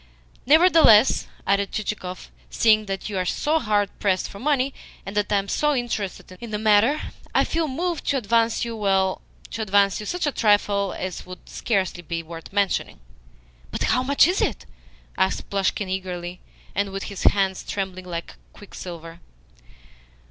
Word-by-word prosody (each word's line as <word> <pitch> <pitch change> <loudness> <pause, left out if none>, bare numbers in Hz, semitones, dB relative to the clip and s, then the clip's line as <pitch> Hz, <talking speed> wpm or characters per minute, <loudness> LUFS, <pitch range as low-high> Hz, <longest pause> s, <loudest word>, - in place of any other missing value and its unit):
"Nevertheless," 310 -7 +6 0.2
added 200 0 +1
Chichikov, 195 -4 -5 0.2
"seeing 215 -2 +3
that 195 0 -4
you 200 -3 -2
are - - +1
so 300 - 0
hard 210 -4 +1
pressed 190 -2 0
for 200 - -10
money, 275 0 +1 0.3
and 195 - -7
that 210 0 0
I - - +4
am 195 0 -1
so 295 +8 +1
interested 210 -7 -4
in 235 - -7
the 210 - -2
matter, 215 +7 +3 0.2
I - - +5
feel 325 -1 -1
moved 335 +4 -3
to 280 - +2
advance 230 0 +1
you 230 -1 -5
well, 195 -3 +1 0.3
to 225 - -4
advance 200 -2 +3
you 210 - -6
such 355 -2 -1
a 290 - +1
trifle 205 -4 +2
as 185 -1 -5
would 185 0 -11
scarcely 190 -6 -1
be 165 0 -4
worth 165 0 -10
mentioning." 200 -1 0 0.7
"But - - -3
how 250 - +2
much 280 +4 +4
is 360 +2 0
it?" - - -1 0.5
asked 190 0 0
Plushkin 200 0 0
eagerly, 180 -1 -5 0.3
and 200 0 0
with 195 0 -5
his 200 - -6
hands 195 -2 +2
trembling 190 -2 -4
like 170 -2 -6 0.2
quicksilver. 170 -4 -9
205 Hz, 165 wpm, -23 LUFS, 190-235 Hz, 0.7 s, Nevertheless